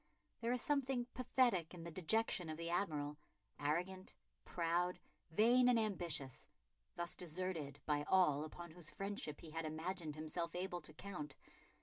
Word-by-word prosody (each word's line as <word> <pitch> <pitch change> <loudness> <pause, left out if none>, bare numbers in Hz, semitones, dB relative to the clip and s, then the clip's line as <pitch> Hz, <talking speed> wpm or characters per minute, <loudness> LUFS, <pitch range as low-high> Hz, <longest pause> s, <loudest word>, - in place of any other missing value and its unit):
There 235 +1 0
is 250 -1 +1
something 270 -4 +2
pathetic 240 -9 +2
in 170 - -7
the 170 - -5
dejection 185 0 +1
of 155 - -3
the 170 0 -2
Admiral, 150 -5 0 0.4
arrogant, 180 +6 -1 0.3
proud, 175 +1 +1 0.3
vain 240 +8 +6
and 245 - +6
ambitious, 170 - -1 0.5
thus 175 0 -1
deserted 165 -4 -3
by 145 -1 +2
all 165 -6 +5
upon 170 +2 -7
whose 165 -1 -7
friendship 195 -7 -4
he 160 - -9
had 165 +1 -2
imagined 160 0 -3
himself 165 +2 -2
able 180 -1 -2
to - - -10
count. 150 -8 -5
175 Hz, 145 wpm, -40 LUFS, 155-195 Hz, 0.5 s, vain